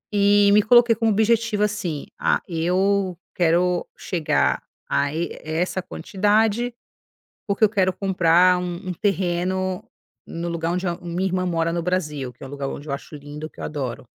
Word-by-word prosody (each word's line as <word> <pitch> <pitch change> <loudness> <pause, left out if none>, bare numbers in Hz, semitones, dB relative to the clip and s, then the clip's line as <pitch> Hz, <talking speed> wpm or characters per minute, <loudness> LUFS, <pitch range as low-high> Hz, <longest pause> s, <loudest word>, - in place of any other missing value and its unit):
E 205 0 +5
me 210 +1 +6
coloquei 240 +2 +6
como 225 0 +1
objetivo 220 0 +2
assim: 200 -8 -2
"Ah, - - +2
eu 185 +2 +1 0.2
quero 175 +1 +2
chegar 150 - 0 0.3
a 140 0 +1
e 165 +3 -4
essa 170 +4 -1
quantidade, 210 +6 +1 0.7
porque 205 +2 +3
eu - - +1
quero 190 -3 +2
comprar 180 -1 +3
um 180 -1 -3
um 180 - -2
terreno 185 -1 -1 0.4
no 170 +1 -5
lugar 170 0 -2
onde 180 +1 -1
a 170 - -1
minha 175 +2 -2
irmã 185 0 -1
mora 165 -1 0
no 170 -1 -2
Brasil", 150 -7 -2
que - - -30
é - - -7
o - - -12
lugar 140 -1 -4
onde 145 +2 -8
eu 140 - -2
acho 140 - -7
lindo, 150 +2 -8
que - - -19
eu - - -4
adoro. 130 -4 -5
180 Hz, 175 wpm, -23 LUFS, 165-200 Hz, 0.7 s, me